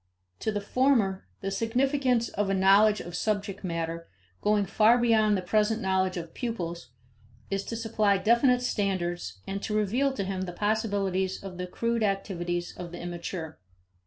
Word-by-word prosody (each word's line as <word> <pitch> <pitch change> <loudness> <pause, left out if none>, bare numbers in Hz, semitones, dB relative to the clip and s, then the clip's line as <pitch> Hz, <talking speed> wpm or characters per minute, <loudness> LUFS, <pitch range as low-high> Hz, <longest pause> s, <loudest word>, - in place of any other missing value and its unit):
To 220 - -1
the 205 -1 -2
former, 215 -4 +1
the 195 - -2
significance 250 +2 +1
of 205 -1 -1
a 195 - +2
knowledge 200 +3 +5
of 175 0 -7
subject 200 0 -2
matter, 165 -1 -3 0.3
going 210 -1 +2
far 220 +5 +4
beyond 220 -3 +3
the 185 - -4
present 215 +4 +2
knowledge 190 -2 0
of 165 -1 -6
pupils, 170 - -4 0.6
is 195 0 -1
to 230 - -4
supply 215 -3 +1
definite 240 +5 +3
standards 175 - -2
and 195 0 -4
to 210 0 -1
reveal 240 +7 +1
to 205 - -2
him 190 -1 -3
the 180 -2 -4
possibilities 200 -3 -1
of 185 -2 -8
the 180 - -3
crude 230 +5 -1
activities 175 -4 -2
of 175 -1 -7
the 175 - -7
immature. 175 -2 -6
200 Hz, 160 wpm, -28 LUFS, 180-220 Hz, 0.6 s, knowledge